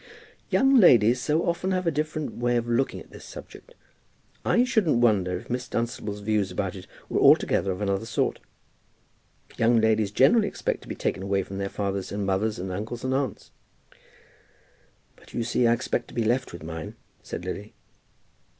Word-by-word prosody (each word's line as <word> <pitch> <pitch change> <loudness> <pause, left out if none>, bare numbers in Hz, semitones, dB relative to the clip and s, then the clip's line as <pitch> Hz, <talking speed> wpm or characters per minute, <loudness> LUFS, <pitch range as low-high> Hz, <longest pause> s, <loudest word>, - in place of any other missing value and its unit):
"Young 270 0 +4
ladies 120 - +6
so 155 +5 0
often 175 +2 -1
have 185 -1 0
a 165 - +2
different 155 0 -3
way 120 0 0
of 120 0 -2
looking 120 +3 0
at - - -14
this - - -12
subject. - - -12 0.7
I 240 - +3
shouldn't 220 - +2
wonder 100 -7 +2
if - - -11
Miss 125 +1 -3
Dunstable's 110 -4 -3
views 105 -2 0
about 95 0 -3
it 95 - -10 0.2
were - - 0
altogether 95 - +4
of 90 +2 -5
another 100 +2 -1
sort. 115 - -1 1.2
Young 115 0 +4
ladies 110 -2 +2
generally 145 - +4
expect - - -3
to - - -15
be - - -5
taken - - -2
away 100 0 0
from 95 +1 -7
their 100 0 -2
fathers 100 -2 -3
and 100 0 -2
mothers, 100 +3 0
and 95 +1 -5
uncles 110 +5 -5
and 130 0 0
aunts." 135 -1 -3 1.6
"But - - -16
you 120 - 0
see 120 +1 +2
I 115 - +5
expect 120 - -2
to - - -14
be 115 - +1
left 125 +4 0
with 85 - -9
mine," 80 0 -6 0.3
said 90 - -7
Lily. 100 +3 -6
115 Hz, 180 wpm, -26 LUFS, 100-130 Hz, 1.6 s, ladies